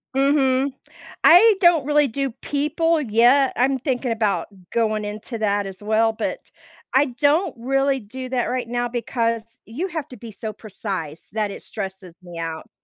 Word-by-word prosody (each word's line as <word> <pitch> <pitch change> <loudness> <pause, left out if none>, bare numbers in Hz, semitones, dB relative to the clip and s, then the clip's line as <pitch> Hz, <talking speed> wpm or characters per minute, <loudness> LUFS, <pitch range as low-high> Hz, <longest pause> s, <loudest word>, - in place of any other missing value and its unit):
Mhm, 270 -1 +2 0.5
I 420 +5 +8
don't 345 -6 +5
really 295 -1 +3
do 275 +3 -2
people 310 +3 +1
yet, 250 +3 +4
I'm 265 +2 +2
thinking 255 -2 -1
about 220 -3 0 0.2
going 215 -2 0
into 215 +3 -6
that 205 -1 +1
as 190 0 -8
well, 220 +1 +2
but - - -5 0.4
I 270 +2 +5
don't 290 +6 +1
really 270 +2 +1
do 255 +4 -8
that 255 -2 0
right 250 -2 -2
now 240 0 -1
because 230 -1 -2
you 305 +12 -4
have 315 -5 -5
to 250 - -10
be 230 -2 -10
so 215 +1 -6
precise 190 -7 -6
that 215 -1 0
it 200 - -8
stresses 190 -4 -7
me 175 -2 -11
out. 165 -1 -5
245 Hz, 165 wpm, -22 LUFS, 215-275 Hz, 0.5 s, I